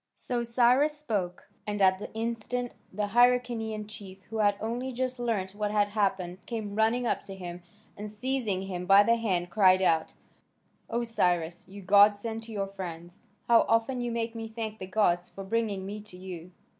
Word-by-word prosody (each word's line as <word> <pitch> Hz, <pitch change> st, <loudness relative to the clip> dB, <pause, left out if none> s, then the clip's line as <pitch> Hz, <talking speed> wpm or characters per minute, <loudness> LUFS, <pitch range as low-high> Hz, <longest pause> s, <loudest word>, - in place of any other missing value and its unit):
So 240 Hz, -1 st, -2 dB
Cyrus 250 Hz, +6 st, +3 dB
spoke. 205 Hz, -11 st, -3 dB, 0.2 s
And 210 Hz, 0 st, -2 dB
at 190 Hz, -1 st, +4 dB
that -, -, -6 dB
instant 235 Hz, +2 st, -3 dB, 0.2 s
the 205 Hz, +1 st, -2 dB
Hyrcanian 235 Hz, -2 st, +2 dB
chief, 200 Hz, -3 st, -10 dB
who 225 Hz, -, -3 dB
had 205 Hz, -1 st, +4 dB
only 240 Hz, +4 st, -3 dB
just 255 Hz, 0 st, -3 dB
learnt 210 Hz, -6 st, -1 dB
what 210 Hz, 0 st, -2 dB
had 205 Hz, -1 st, +2 dB
happened, 190 Hz, -3 st, -1 dB
came 220 Hz, -4 st, -4 dB
running 225 Hz, +3 st, +2 dB
up -, -, 0 dB
to 195 Hz, -, -6 dB
him, 180 Hz, -1 st, -7 dB, 0.3 s
and 210 Hz, +1 st, -6 dB
seizing 215 Hz, -3 st, -1 dB
him 180 Hz, -2 st, -5 dB
by 200 Hz, +1 st, +8 dB
the 230 Hz, -, +4 dB
hand 180 Hz, -6 st, -1 dB
cried 190 Hz, -2 st, +5 dB
out: 160 Hz, -3 st, +2 dB, 0.7 s
"O 235 Hz, +1 st, -1 dB
Cyrus, 175 Hz, -7 st, 0 dB
you 200 Hz, +1 st, -10 dB
godsend 205 Hz, +3 st, +4 dB
to 230 Hz, -, -10 dB
your 200 Hz, -2 st, -1 dB
friends! 175 Hz, +2 st, -8 dB, 0.2 s
How 235 Hz, -1 st, +6 dB
often 230 Hz, +3 st, +2 dB
you 240 Hz, -1 st, -2 dB
make 230 Hz, 0 st, -2 dB
me 225 Hz, -1 st, -5 dB
thank 220 Hz, -1 st, -5 dB
the 185 Hz, -, -6 dB
gods 180 Hz, -3 st, +1 dB
for 195 Hz, -, -8 dB
bringing 205 Hz, -2 st, -1 dB
me 210 Hz, +2 st, -6 dB
to 205 Hz, -3 st, -13 dB
you!" 180 Hz, -2 st, -8 dB
210 Hz, 180 wpm, -29 LUFS, 190-230 Hz, 0.7 s, by